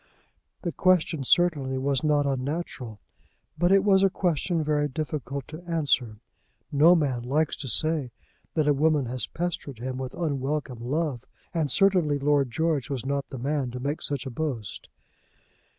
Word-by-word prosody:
The 175 Hz, -, -1 dB
question 175 Hz, -5 st, +2 dB
certainly 145 Hz, -4 st, +2 dB
was 135 Hz, 0 st, 0 dB
not 150 Hz, -2 st, +3 dB
unnatural. 135 Hz, -4 st, -3 dB, 0.6 s
But 175 Hz, +1 st, +2 dB
it 195 Hz, 0 st, +5 dB
was 195 Hz, -2 st, +5 dB
a 195 Hz, -, +5 dB
question 175 Hz, -2 st, 0 dB
very 150 Hz, -1 st, +1 dB
difficult 140 Hz, -2 st, -4 dB
to 155 Hz, +2 st, -8 dB
answer. 145 Hz, -9 st, +1 dB, 0.5 s
No 155 Hz, +5 st, +6 dB
man 135 Hz, -7 st, 0 dB
likes 145 Hz, +6 st, 0 dB
to 135 Hz, -, -6 dB
say 155 Hz, 0 st, +1 dB, 0.5 s
that 155 Hz, -2 st, +2 dB
a 145 Hz, -, +5 dB
woman 150 Hz, -1 st, +2 dB
has 120 Hz, -4 st, -3 dB
pestered 170 Hz, -6 st, -4 dB
him 130 Hz, +2 st, -4 dB
with 130 Hz, -1 st, -5 dB
unwelcome 140 Hz, -4 st, -2 dB
love, 135 Hz, 0 st, -2 dB, 0.3 s
and 160 Hz, -4 st, 0 dB
certainly 175 Hz, -2 st, +3 dB
Lord 140 Hz, -1 st, +2 dB
George 155 Hz, +2 st, 0 dB
was 130 Hz, -3 st, -3 dB
not 140 Hz, 0 st, -2 dB
the 135 Hz, -, -6 dB
man 140 Hz, +1 st, -1 dB
to 125 Hz, +1 st, -6 dB
make 140 Hz, +4 st, -2 dB
such 140 Hz, -2 st, -2 dB
a 135 Hz, -, -5 dB
boast. 120 Hz, -7 st, -4 dB
145 Hz, 160 wpm, -26 LUFS, 130-160 Hz, 0.6 s, No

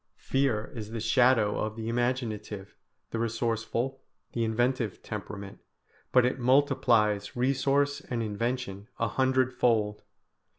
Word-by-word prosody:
Fear 135 Hz, -6 st, 0 dB
is 110 Hz, -3 st, -6 dB
the 115 Hz, 0 st, -4 dB
shadow 115 Hz, -1 st, +3 dB
of 110 Hz, 0 st, -2 dB
the 110 Hz, 0 st, -5 dB
imaginative, 115 Hz, -4 st, -2 dB, 0.4 s
the 115 Hz, -, -2 dB
resourceful, 115 Hz, +3 st, -1 dB, 0.3 s
the 115 Hz, -, 0 dB
inventive 120 Hz, -1 st, 0 dB
temperament, 100 Hz, -1 st, -7 dB, 0.5 s
but 125 Hz, -1 st, +5 dB
it 125 Hz, -, 0 dB
multiplies 120 Hz, -6 st, +3 dB
resource 140 Hz, +3 st, +1 dB
and 120 Hz, -2 st, -1 dB
invention 110 Hz, -1 st, -3 dB
a 115 Hz, -, +1 dB
hundredfold. 125 Hz, -4 st, +2 dB
115 Hz, 115 wpm, -29 LUFS, 110-130 Hz, 0.5 s, but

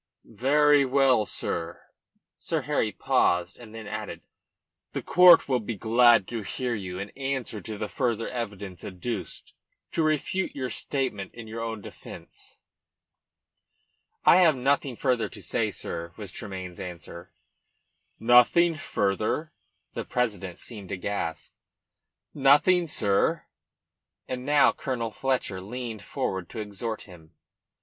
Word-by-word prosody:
"Very 145 Hz, +5 st, +4 dB
well, 130 Hz, -4 st, +3 dB
sir." 85 Hz, -1 st, -3 dB, 0.6 s
Sir -, -, -1 dB
Harry -, -, 0 dB
paused 90 Hz, +4 st, +1 dB
and 115 Hz, -2 st, -12 dB
then 110 Hz, -1 st, -7 dB
added -, -, -6 dB, 0.7 s
"The -, -, -3 dB
court 180 Hz, -1 st, +7 dB
will 130 Hz, -2 st, +2 dB
be 110 Hz, +1 st, -4 dB
glad 115 Hz, 0 st, +5 dB
to 115 Hz, -2 st, -3 dB
hear 125 Hz, +4 st, -3 dB
you 95 Hz, -4 st, -5 dB
in 100 Hz, +2 st, -5 dB
answer 135 Hz, -5 st, -3 dB
to 110 Hz, +2 st, -6 dB
the 105 Hz, -, -3 dB
further 115 Hz, -3 st, -1 dB
evidence 100 Hz, -7 st, -6 dB
adduced 95 Hz, +2 st, -5 dB, 0.4 s
to -, -, 0 dB
refute 155 Hz, +5 st, 0 dB
your 130 Hz, -3 st, -3 dB
statement 115 Hz, -8 st, -3 dB
in 115 Hz, -1 st, -8 dB
your 115 Hz, +1 st, -6 dB
own 115 Hz, -2 st, -4 dB
defence." -, -, -12 dB, 1.7 s
"I -, -, +8 dB
have 170 Hz, -5 st, +6 dB
nothing 135 Hz, 0 st, +1 dB
further 120 Hz, -4 st, 0 dB
to -, -, -11 dB
say, -, -, 0 dB
sir," 85 Hz, 0 st, -6 dB
was 100 Hz, -4 st, -7 dB
Tremayne's 95 Hz, -3 st, -7 dB
answer. 85 Hz, -1 st, -8 dB, 0.9 s
"Nothing 125 Hz, +9 st, +5 dB
further?" 110 Hz, -, -1 dB, 0.4 s
The -, -, -3 dB
president 100 Hz, -8 st, -2 dB
seemed 105 Hz, -6 st, -9 dB
aghast. 95 Hz, -4 st, -4 dB, 0.8 s
"Nothing, 150 Hz, +6 st, +4 dB
sir." 100 Hz, -9 st, +1 dB, 0.8 s
And 125 Hz, +1 st, -5 dB
now 145 Hz, 0 st, +5 dB
Colonel 115 Hz, -4 st, -3 dB
Fletcher 125 Hz, -7 st, -1 dB
leaned 115 Hz, +1 st, -6 dB
forward 95 Hz, -2 st, -3 dB
to 115 Hz, -, -7 dB
exhort 110 Hz, +1 st, -4 dB
him. 85 Hz, -5 st, -16 dB
115 Hz, 125 wpm, -27 LUFS, 100-135 Hz, 1.7 s, I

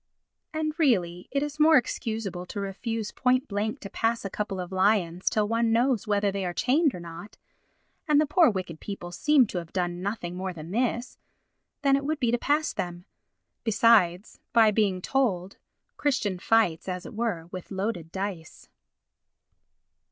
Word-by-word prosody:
And 310 Hz, -1 st, -2 dB
really 180 Hz, -, +1 dB
it 280 Hz, +2 st, 0 dB
is 295 Hz, 0 st, -5 dB
more 310 Hz, +1 st, +7 dB
excusable 220 Hz, -7 st, -3 dB
to 205 Hz, -, -5 dB
refuse 210 Hz, +2 st, -3 dB
point 255 Hz, +2 st, +1 dB
blank 210 Hz, +2 st, -2 dB
to 200 Hz, -, -7 dB
pass 230 Hz, 0 st, 0 dB
a 195 Hz, -, -4 dB
couple 205 Hz, -2 st, -3 dB
of 180 Hz, 0 st, -5 dB
lions 185 Hz, -2 st, +2 dB
till 210 Hz, -1 st, +1 dB
one 230 Hz, +1 st, +1 dB
knows 235 Hz, -1 st, +2 dB
whether 205 Hz, -1 st, +2 dB
they 195 Hz, 0 st, -3 dB
are 175 Hz, -1 st, -3 dB
chained 285 Hz, +2 st, +2 dB
or -, -, -6 dB
not—and 175 Hz, -, -5 dB
the 305 Hz, -, +4 dB
poor 330 Hz, +2 st, +5 dB
wicked 185 Hz, -6 st, -4 dB
people 185 Hz, -4 st, -7 dB
seem 285 Hz, +8 st, +4 dB
to 185 Hz, -, -4 dB
have 170 Hz, -1 st, -10 dB
done 175 Hz, -1 st, -2 dB
nothing 190 Hz, -3 st, -4 dB
more 185 Hz, 0 st, -4 dB
than 165 Hz, 0 st, -9 dB
this,—than 250 Hz, +4 st, -2 dB
it 275 Hz, -, -1 dB
would 305 Hz, +1 st, -1 dB
be 240 Hz, -4 st, +1 dB
to 240 Hz, -, +1 dB
pass 300 Hz, +4 st, +1 dB
them. 175 Hz, 0 st, -5 dB, 0.6 s
Besides, 215 Hz, -4 st, +3 dB
by 225 Hz, -2 st, +6 dB
being 195 Hz, -4 st, +1 dB
told, 200 Hz, -9 st, 0 dB, 0.4 s
Christian 235 Hz, -10 st, 0 dB
fights, 190 Hz, -5 st, +2 dB
as 180 Hz, 0 st, -4 dB
it -, -, -9 dB
were, 215 Hz, -7 st, -2 dB
with 185 Hz, -2 st, -7 dB
loaded 190 Hz, -4 st, -3 dB
dice. 190 Hz, -4 st, -6 dB
210 Hz, 165 wpm, -27 LUFS, 180-245 Hz, 0.6 s, more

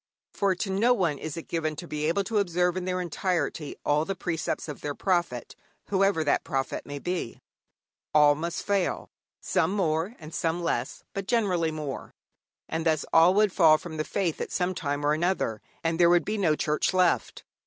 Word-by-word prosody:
For 195 Hz, -2 st, +1 dB
to 195 Hz, +2 st, -3 dB
no 230 Hz, +6 st, +3 dB
one 170 Hz, -, 0 dB
is 155 Hz, -1 st, -5 dB
it 165 Hz, -, -7 dB
given 155 Hz, -2 st, -2 dB
to 175 Hz, -, -8 dB
be 150 Hz, -1 st, -2 dB
able 195 Hz, +5 st, +1 dB
to 215 Hz, +1 st, 0 dB
observe 180 Hz, -2 st, +1 dB
in 185 Hz, -1 st, -3 dB
their 185 Hz, 0 st, -1 dB
entirety 170 Hz, -3 st, -2 dB
all 150 Hz, +1 st, +3 dB
the 195 Hz, +4 st, -3 dB
precepts 165 Hz, -3 st, -3 dB
of 150 Hz, -, -7 dB
their 145 Hz, -1 st, -3 dB
prophet, 175 Hz, -, -1 dB, 0.3 s
whoever 195 Hz, -4 st, +2 dB
that 145 Hz, -, +1 dB
prophet 135 Hz, 0 st, -3 dB
may 145 Hz, 0 st, -5 dB
be. 175 Hz, -5 st, -4 dB, 0.7 s
All 150 Hz, -1 st, +6 dB
must 170 Hz, +3 st, -4 dB
fail, 200 Hz, -3 st, -1 dB, 0.3 s
some 180 Hz, -2 st, +1 dB
more 175 Hz, +2 st, 0 dB
and 155 Hz, -1 st, -11 dB
some 170 Hz, +1 st, -1 dB
less, 170 Hz, -, -2 dB
but 195 Hz, -1 st, -4 dB
generally 185 Hz, -9 st, +1 dB
more, 150 Hz, -3 st, -6 dB, 0.5 s
and 165 Hz, 0 st, -2 dB
thus 160 Hz, -2 st, +1 dB
all 170 Hz, +3 st, +6 dB
would 210 Hz, -2 st, +3 dB
fall 160 Hz, -4 st, +6 dB
from 160 Hz, 0 st, -8 dB
the 155 Hz, -, 0 dB
faith 175 Hz, -1 st, -2 dB
at -, -, -4 dB
some 180 Hz, 0 st, 0 dB
time 145 Hz, -3 st, -2 dB
or 150 Hz, -, +3 dB
another, 155 Hz, -, 0 dB, 0.2 s
and 165 Hz, 0 st, 0 dB
there 170 Hz, -1 st, +6 dB
would 175 Hz, 0 st, +4 dB
be 215 Hz, 0 st, -2 dB
no 165 Hz, -6 st, +3 dB
Church 150 Hz, +5 st, 0 dB
left. 180 Hz, -2 st, +1 dB
170 Hz, 195 wpm, -27 LUFS, 155-185 Hz, 0.7 s, All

